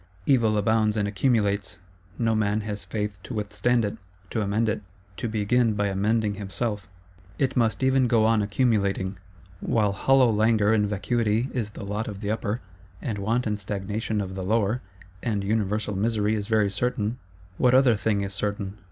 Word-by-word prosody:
Evil 115 -6 +3
abounds 110 +1 +2
and 105 -1 +1
accumulates: 100 -2 +1 0.4
no 115 -2 +1
man 105 0 +1
has 105 -1 -5
Faith 105 0 -4
to 120 - -7
withstand 105 +3 +1
it, 100 - -4 0.3
to 110 - -1
amend 105 +3 +1
it, 105 - -1 0.4
to 115 - -3
begin 110 +1 +2
by 105 0 +1
amending 105 +2 +1
himself; 100 0 -3 0.5
it 135 -1 0
must 115 +1 +1
even 130 -1 +3
go 115 -2 +3
on 110 -1 +3
accumulating. 100 -3 0 0.4
While 105 -3 +1
hollow 130 +4 +4
langour 110 0 +3
and 105 -2 +2
vacuity 110 +3 0
is 115 -5 -2
the 105 -1 -8
lot 105 +2 -3
of 100 -1 -6
the 105 -1 -1
Upper, 110 +1 -2 0.4
and 110 -7 -3
want 115 +5 0
and 105 -1 -1
stagnation 105 +2 -2
of 95 -1 -5
the 95 0 -4
Lower, 110 +3 +1 0.4
and 105 -4 -1
universal 105 0 0
misery 105 +1 +1
is 105 -2 -2
very 110 -3 +2
certain, 115 +2 -1 0.4
what 125 0 +4
other 130 -3 +5
thing 105 0 0
is 100 0 -4
certain? 100 0 -3
105 Hz, 170 wpm, -25 LUFS, 100-115 Hz, 0.5 s, other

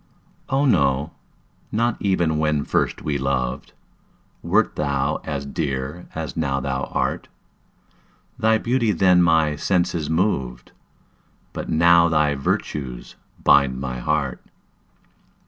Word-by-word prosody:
Oh, 135 +2 +2
no 70 - +2 0.6
not 115 +2 0
even 85 -6 +1
when 75 -2 +1
first - - -1
we 70 -2 -1
loved, 65 -2 -2 0.7
Wert - - +1
thou 70 -1 0
as 70 -2 -4
dear 70 +2 -4
as 80 -4 -5
now 70 -4 -1
thou 65 0 -2
art; - - -2 1.1
Thy 110 0 +3
beauty 115 -1 0
then 90 0 +4
my 80 -3 +3
senses 85 -2 0
moved, 70 - -1 0.8
But - - -6
now 85 +1 +5
thy 75 -2 +2
virtues 70 -2 -3 0.3
bind 70 -2 +4
my 65 -2 -4
heart. 70 0 -2
75 Hz, 110 wpm, -22 LUFS, 70-85 Hz, 1.1 s, now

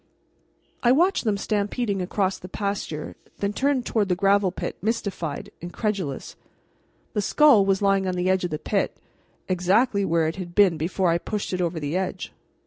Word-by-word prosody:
I 240 - +4
watched 345 +3 +3
them 210 -2 +1
stampeding 205 0 -1
across 190 +1 -1
the 180 - -10
pasture, 200 -7 -4 0.2
then 200 0 -1
turned 270 0 +1
toward 210 -4 0
the 180 - +2
gravel 195 0 +3
pit, - - -5
mystified, 200 -8 -3
incredulous. 175 - -3 0.8
The 210 - 0
skull 250 -2 +5
was 195 +1 +1
lying 195 -1 +2
on 185 - -1
the 180 0 -1
edge 185 0 +2
of 180 - -1
the 155 - -3
pit, - - -1 0.5
exactly 200 +5 +2
where 165 -3 +2
it 160 - -3
had 175 -2 -7
been 195 -5 +5
before 175 +3 0
I 170 - +1
pushed 210 +1 -4
it 180 - -1
over 170 -1 -1
the 145 +2 -3
edge. 185 0 -3
195 Hz, 175 wpm, -24 LUFS, 180-210 Hz, 0.8 s, skull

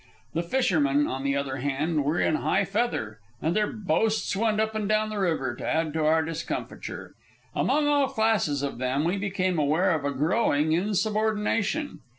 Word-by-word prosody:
The 165 - 0
fishermen, 160 - +2
on 135 0 -3
the 140 0 +1
other 135 -2 -2
hand, 145 +3 -1
were 150 +5 0
in 155 - +2
high - - +1
feather, 195 - -2 0.2
and 160 +2 -1
their 210 -1 +1
boasts 215 +1 0
went 215 +1 +1
up 220 0 0
and 215 -2 -2
down 215 0 +1
the 210 - -3
river 160 -9 0
to - - -9
add 160 -1 0
to 160 -1 0
our 160 +1 +3
discomfiture. 165 0 -5 0.4
Among 300 0 +1
all 285 -2 +3
classes 220 - +1
of 140 -4 -3
them 130 +3 0
we 175 +4 0
became 185 -3 -1
aware 155 +6 +2
of 155 -4 0
a 145 - 0
growing 150 - +1
insubordination. 215 - 0
170 Hz, 175 wpm, -26 LUFS, 145-215 Hz, 0.4 s, our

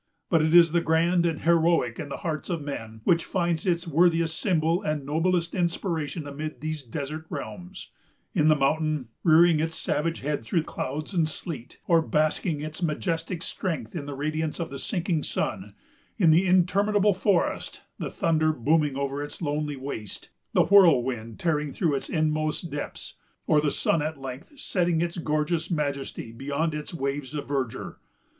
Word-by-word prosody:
But 165 -3 +5
it 160 +2 +3
is 170 -2 +8
the 170 0 +2
grand 170 +2 +3
and 160 -2 -2
heroic 165 -7 +3
in 145 - -5
the - - -4
hearts 155 -1 -3
of 170 -4 -2
men 115 -6 -6
which 170 +4 +3
finds 170 -2 -1
its 170 -1 +1
worthiest 165 0 +2
symbol 165 -2 +1
and 150 -2 -2
noblest 170 +3 +1
inspiration 170 -3 -1
amid 145 -1 -6
these 155 +1 -3
desert 145 +5 -6
realms,——in 180 -3 -5
the 155 - +6
mountain, 150 -2 0
rearing 165 -1 +6
its 160 +1 -1
savage 165 +2 -1
head 145 -3 -2
through 155 +8 0
clouds 150 +4 -4
and 165 -4 +2
sleet, 150 -6 -7
or 165 -1 +5
basking 155 0 0
its 155 +3 -6
majestic 165 +1 -2
strength 145 - -4
in 145 -4 -4
the 145 - -5
radiance 155 +3 -2
of 170 - -3
the 140 - -5
sinking 175 - -1
sun; - - -3 0.4
in 175 -7 +5
the 175 +4 +4
interminable 200 +3 +3
forest, 185 -1 0 0.2
the - - -3
thunder 155 -1 +2
booming 150 +1 +1
over 140 0 -2
its 145 - -8
lonely 150 -2 -2
waste, 130 -7 -7 0.2
the - - +5
whirlwind 130 - +4
tearing 150 -3 0
through 165 -2 0
its 135 - -3
inmost 155 +1 0
depths, 145 0 -5 0.3
or 150 - +4
the 150 - +1
sun 160 - +1
at 155 0 -3
length 135 - -8
setting 175 -7 +1
in 170 +1 0
gorgeous 155 +2 0
majesty 140 -7 -3
beyond 140 +6 -2
its 150 0 -5
waves 140 -2 -3
of 145 - -4
verdure. 135 -4 -3
155 Hz, 165 wpm, -26 LUFS, 145-170 Hz, 0.4 s, is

